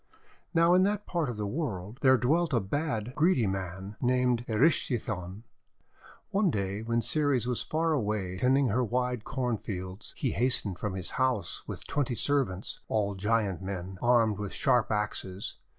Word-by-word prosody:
Now 170 0 +4
in 180 - +6
that 205 +2 +1
part 170 -6 -1
of 120 - -5
the 105 - -2
world 110 - -4
there 130 -1 +6
dwelt 155 +6 +1
a 120 - +4
bad, 125 +1 -2
greedy 155 -7 +3
man 95 +1 -4
named 125 -1 +2
Erysichthon. 110 - 0 0.9
One 200 -1 +3
day 100 -4 -2
when 115 +1 0
Ceres 135 0 +1
was 125 -1 -1
far 160 +1 0
away 105 -8 -1
tending 130 +1 +3
her 125 +5 +2
wide 125 0 -1
corn 125 -3 -1
fields, 95 0 -6
he - - 0
hastened 110 -5 0
from 105 -3 -3
his 95 -2 -4
house 125 -9 0
with - - -6
twenty 135 -4 -1
servants, 125 -9 0
all 105 -2 0
giant 100 -1 0
men 95 -1 -5
armed 115 -4 +3
with 100 -2 -4
sharp 120 -3 +2
axes. 105 -2 -3
115 Hz, 160 wpm, -29 LUFS, 100-130 Hz, 0.9 s, in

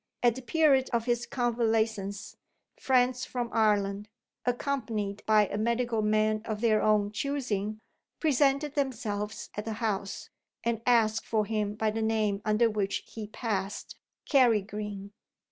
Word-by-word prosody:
At 240 -1 +5
the 260 - -7
period 275 -2 +3
of 230 -1 +1
his 240 -1 0
convalescence, 225 -4 -1 0.4
friends 255 -1 +2
from 245 -2 -3
Ireland 205 -2 +1 0.4
(accompanied 225 -6 -2
by 215 -1 +5
a 205 +1 -4
medical 235 0 0
man 215 0 +2
of 215 -1 -3
their 220 -2 +3
own 210 -1 +2
choosing) 215 -5 -2 0.4
presented 280 -1 +2
themselves 220 -7 -3
at 210 - -4
the 225 - -3
house, 205 -3 -3 0.3
and 230 -1 -1
asked 220 -3 +3
for 215 -2 +1
him 210 -1 -1
by 215 0 0
the 225 +1 -3
name 215 -2 0
under 215 +2 +3
which 210 -3 -1
he 220 -2 -8
passed 205 -3 -4 0.3
Carrigeen. 210 -6 +1
220 Hz, 135 wpm, -29 LUFS, 210-240 Hz, 0.4 s, At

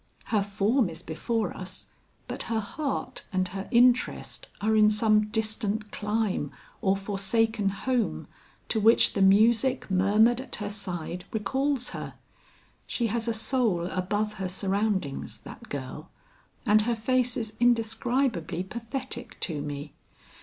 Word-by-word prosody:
Her 210 - +4
form 205 +3 +1
is 165 +1 -7
before 205 +5 -2
us, 185 0 -7 0.4
but - - -3
her 225 -1 +1
heart 265 +3 -4
and 185 -2 0
her 195 +1 -5
interest 245 +1 +2
are 220 +1 +2
in 215 -1 +6
some 215 0 +3
distant 215 -1 -1
clime 210 -7 -1 0.3
or 195 0 +2
forsaken 205 +2 +1
home 240 +4 -1 0.4
to 220 - +1
which 225 +2 +5
the 200 - 0
music 225 +5 +4
murmured 210 +6 +4
at 265 - -7
her 210 -1 -4
side 180 -3 -4
recalls 265 +5 0
her. - - -6 0.7
She 235 - -1
has 235 -1 -1
a 230 - +1
soul 220 -6 +1
above 205 +3 -1
her 185 - -1
surroundings, 195 -5 -1
that - - -11
girl; 140 +3 -6 0.6
and 215 -1 +5
her 235 +2 0
face 250 +2 +1
is 220 -2 -3
indescribably 230 - +1
pathetic 235 +3 -5
to 155 -5 -1
me. 145 0 -6
215 Hz, 135 wpm, -27 LUFS, 195-235 Hz, 0.7 s, in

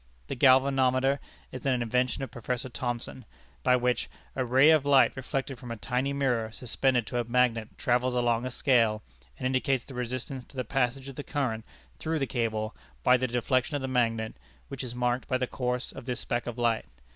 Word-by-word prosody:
The - - -2
galvanometer 135 +1 +4 0.3
is 130 - -7
an 130 -2 +2
invention 125 +3 0
of 130 - -5
Professor 125 +2 -3
Thomson, 120 0 -4 0.4
by 125 - +4
which 125 0 0 0.3
"a 130 - 0
ray 130 +5 +6
of 155 -3 +5
light 140 -2 +5
reflected 135 0 -3
from 125 - -9
a 115 - -4
tiny 125 +5 -1
mirror 125 -6 0
suspended 125 +1 0
to 120 - -2
a - - +1
magnet 120 -2 +1
travels 125 -1 +1
along 120 0 +1
a - - -2
scale, 115 -4 +2 0.3
and - - -5
indicates 130 -1 +1
the 135 - -10
resistance 125 +1 -4
to - - -18
the 130 - -1
passage 130 +2 -1
of 135 - -9
the 145 - -4
current 125 -8 -2 0.4
through 160 0 -1
the 140 - 0
cable 110 -3 -2 0.3
by 125 - +6
the 130 0 +1
deflection 130 +4 0
of 140 - -2
the - - -1
magnet, 115 -3 0 0.4
which 135 -1 -5
is 120 -1 -6
marked 125 +1 0
by 130 - +1
the 130 - 0
course 125 0 -2
of 135 - -10
this 125 -2 -2
speck 120 0 -2
of 120 0 -4
light. 115 -2 +1
125 Hz, 200 wpm, -28 LUFS, 120-135 Hz, 0.4 s, ray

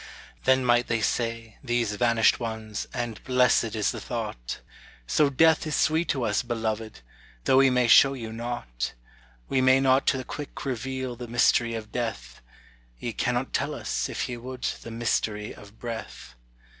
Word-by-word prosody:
Then 130 0 +4
might 120 0 +3
they 115 - 0
say 115 0 -2
these 120 -4 0
vanished 115 0 +3
ones 110 -3 -4
and 120 -3 -4
blessed 125 -3 +3
is 105 -2 +1
the - - -6
thought, - - -5 0.5
"So 145 - +3
death 160 +3 +4
is 155 - -1
sweet 160 +2 +2
to 135 -3 0
us, 105 -3 +1
beloved! 110 - -3 0.4
though 130 - +4
we 135 0 +6
may 125 -1 +2
show 135 +3 +7
you 115 -3 -6
nought; 115 - -4 0.5
We 135 - +1
may 130 +1 +5
not 135 0 +3
to 135 - +3
the 130 - -4
quick 145 +3 -7
reveal 130 0 -3
the 120 0 -8
mystery 120 0 +3
of 110 -1 -7
death 65 - -4 0.6
Ye 115 - -4
cannot 125 +3 -1
tell 145 +2 -1
us, - - -2
if - - -2
ye 125 -2 -5
would, 125 +1 -8 0.2
the - - -8
mystery 110 -2 -1
of 100 +1 -15
breath." 115 - -7
120 Hz, 170 wpm, -26 LUFS, 110-130 Hz, 0.6 s, show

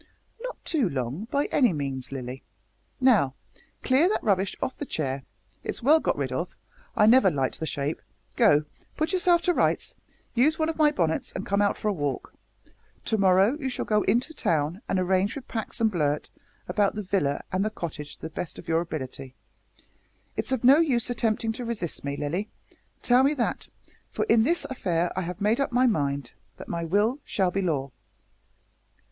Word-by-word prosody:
"Not - - -5
too 280 - +1
long, 135 - -3
by 280 +4 0
any 245 -9 +4
means, 135 -4 -4
Lilly. 130 -1 -6 0.6
Now, 215 - +4 0.5
clear 275 +7 +4
that 430 - -1
rubbish 195 -2 +1
off 260 - -2
the - - -6
chair 135 -3 -2 0.4
it's - - -4
well 305 +5 +6
got - - 0
rid - - -2
of, - - -3 0.4
I 210 - +6
never 230 -2 +6
liked 135 -5 -1
the 160 - -3
shape 145 +2 -3 0.3
go, 150 +1 +4 0.3
put 315 +4 0
yourself 350 -2 +3
to 355 - +3
rights, - - +1 0.4
use 280 +6 +3
one 315 0 +1
of 325 - -2
my 305 -1 +5
bonnets, 165 - -1
and 190 - -4
come 200 +1 +1
out 205 - +2
for - - -3
a 210 - +2
walk. 145 -7 -3 0.7
To 220 - +1
morrow 195 +5 +4
you 265 -3 -2
shall 250 - -3
go 210 -1 +2
into 245 +10 +1
town 160 - 0
and - - +1
arrange 185 +2 +1
with 275 -3 -8
Pax 225 +1 -4
and 225 -1 +3
Blurt 150 -5 -1 0.4
about 200 +3 +1
the 210 - -3
villa 180 -7 0
and 185 +1 +1
the 215 - 0
cottage 160 -7 -6
to - - -33
the 160 - -4
best 170 0 -5
of - - -11
your 165 0 +2
ability. 135 -5 -6 1.0
It's - - -2
of 260 -3 0
no 270 +5 +7
use 255 -7 +2
attempting 225 -1 0
to 235 +3 -5
resist 225 -8 -3
me, 140 0 -3
Lilly 175 +9 -2 0.5
tell 250 +1 +5
them 285 +3 +3
that 245 - -2 0.4
for - - -2
in 235 - +4
this 330 +9 +2
affair 175 -9 -1
I 185 - 0
have 180 +2 -5
made 215 +4 +2
up 275 - 0
my 250 +2 +3
mind 140 - 0 0.2
that - - -10
my 170 0 -3
will 205 - +1
shall 190 -3 0
be 195 - -1
law." 140 -7 -1
200 Hz, 190 wpm, -26 LUFS, 155-250 Hz, 1.0 s, no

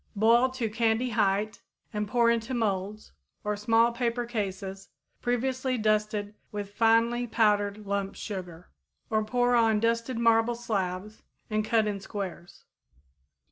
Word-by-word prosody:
Boil 230 +5 +4
to 255 -3 -2
candy 225 +2 +1
height 210 -1 0 0.3
and 210 0 -2
pour 235 +2 +3
into 235 +2 -1
molds 210 -2 -2 0.3
or 210 0 -1
small 225 +3 +3
paper 235 0 -1
cases 195 -4 -4 0.3
previously 255 +1 0
well 225 - -3
dusted 210 -1 0 0.2
with 205 -1 -5
finely 230 +2 +3
powdered 210 -2 +1
lump 200 -1 -2
sugar, 180 -4 -7 0.4
or 215 0 +2
pour 245 +3 +1
on 225 -3 +4
dusted 230 +2 0
marble 230 0 +3
slabs 205 -3 -3 0.3
and 215 0 +1
cut 220 0 +2
in 205 -2 -2
squares. 190 -3 -7
220 Hz, 135 wpm, -28 LUFS, 205-235 Hz, 0.4 s, Boil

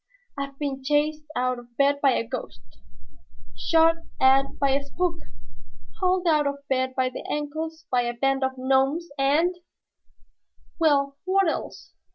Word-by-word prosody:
I've 275 -1 -5
been 275 -2 -4
chased 300 +2 +1
out 255 0 0
of 240 0 -17
bed 285 0 +3
by 275 -2 +4
a 230 - -1
ghost, 125 - -8 0.8
shot 330 0 +3 0.2
at 270 +1 +4
by 275 -1 +2
a 275 +1 +2
spook, 335 +4 -2 0.8
hauled 365 0 +1
out 305 -3 +3
of 280 0 -5
bed 260 -1 0
by 255 -1 +1
the 255 - -8
ankles 315 +2 -4
by 250 -1 +3
a 240 0 -2
band 270 +2 +1
of 265 0 0
gnomes, 270 +6 +1
and 315 +7 +2 0.6
" - - -39
"Well, 280 -3 +2
what 385 0 +3
else?" 320 - -4
280 Hz, 155 wpm, -25 LUFS, 265-315 Hz, 0.8 s, by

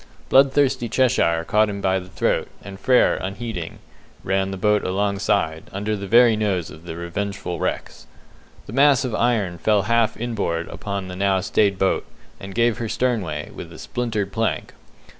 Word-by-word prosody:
Bloodthirsty 135 -3 +3
Cheshire 95 -10 +2
caught 105 0 +3
him 100 -1 -4
by 95 -1 +1
the 90 0 -11
throat, - - 0 0.2
and 95 0 -9
Frere, 125 -1 +4
unheeding, 95 -3 -5 0.5
ran 95 0 0
the 95 - -5
boat 105 +2 +2
alongside, 100 -3 0
under 105 +2 -2
the 100 -1 -6
very 115 +2 +6
nose 100 -6 -1
of 80 +2 -13
the 80 -2 -6
revengeful 90 0 -4
Rex. - - -4 0.6
The - - -9
mass 140 0 +4
of 125 - -3
iron 110 -8 0
fell 105 -2 +2
half 115 0 +1
in 120 +1 -3
board 85 -6 -2
upon 100 -2 -5
the 90 - -7
now 95 0 +2
stayed 100 +1 +1
boat, 95 0 0 0.3
and 95 0 -9
gave 120 -1 +2
her 115 -2 -3
sternway, 100 -14 -1
with 85 - -9
a 80 - -11
splintered 105 +4 -3
plank. 115 +3 -2
100 Hz, 170 wpm, -22 LUFS, 95-115 Hz, 0.6 s, very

